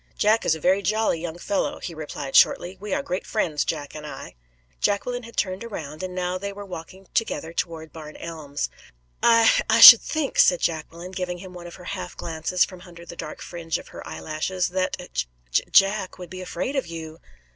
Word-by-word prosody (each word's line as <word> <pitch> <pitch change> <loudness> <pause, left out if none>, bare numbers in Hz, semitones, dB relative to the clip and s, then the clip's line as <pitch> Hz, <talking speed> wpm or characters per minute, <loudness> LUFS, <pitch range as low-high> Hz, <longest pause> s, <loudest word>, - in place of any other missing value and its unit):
"Jack 215 +2 +3
is 160 - +4
a - - -8
very 190 +5 +3
jolly 210 -3 +1
young 170 -1 -5
fellow," 195 +3 -1
he 170 - -6
replied, 150 -3 -6
shortly. 180 +2 +4
"We 205 +1 -7
are - - 0
great 180 +2 -3
friends, 160 -9 0
Jack 145 -1 -4
and 155 - -8
I." 150 - -8 0.5
Jacqueline 245 +5 0
had 230 -1 -13
turned 185 +1 -1
around, 155 -9 -7
and 185 0 -5
they 185 +2 -2
were 205 +1 -8
now 200 - -14
walking 180 +2 -9
together 165 -7 -1
toward 165 -2 -4
Barn 155 -2 -9
Elms. 150 - -5 0.5
"I 230 -1 +5
I 225 0 +4
should 235 0 +13
think," 310 -3 -2
said 180 - +6
Jacqueline, 170 +2 -3
giving 180 -1 -3
him 185 +1 -10
one 175 -1 -9
of 170 - -10
her 180 - -13
half 185 +1 -6
glances 165 +2 0
from 185 -2 -12
under 170 -2 -13
the 170 - -9
dark 155 - -7
fringe 165 -2 -3
of - - -12
her - - -9
eyelashes 155 - -2
"that 185 +1 -1 0.5
J - - +2
Jack 195 -1 +4
would 180 -2 -10
be 185 0 -7
afraid 250 +9 -4
of 270 - -1
you." 165 -1 -8
180 Hz, 200 wpm, -24 LUFS, 160-195 Hz, 0.5 s, should